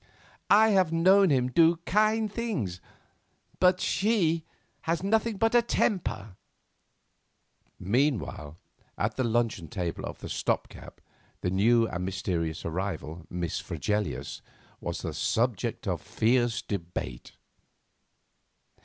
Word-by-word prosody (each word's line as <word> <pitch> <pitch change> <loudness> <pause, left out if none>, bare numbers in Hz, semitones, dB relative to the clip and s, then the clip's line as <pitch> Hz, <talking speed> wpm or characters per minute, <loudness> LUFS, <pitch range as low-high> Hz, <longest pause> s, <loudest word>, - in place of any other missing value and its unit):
I 220 +2 +6
have 190 -5 +3
known 190 +4 +5
him 125 -3 +2
do 165 +5 +5
kind 215 +1 +2
things, 125 - -3 0.8
but 180 0 +4
she 180 -8 +1 0.3
has 165 +2 -1
nothing 220 +1 +1
but 225 +3 +2
a 240 - +6
temper." 110 - -1 1.4
Meanwhile, 100 - -1 0.4
at - - -1
the 130 - 0
luncheon 115 -7 0
table 85 +1 -4
of - - -6
the - - -8
Stop - - -1
gap - - -13 0.4
the 90 - -1
new 115 +4 +4
and 90 -2 -4
mysterious 90 -4 -2
arrival, 85 -2 -4
Miss 85 -3 -3
Fregelius, 105 -12 -3 0.4
was - - -5
the - - -3
subject 115 -2 -1
of - - -1
fierce 120 0 +1
debate. 85 - -5
120 Hz, 115 wpm, -28 LUFS, -, 1.4 s, I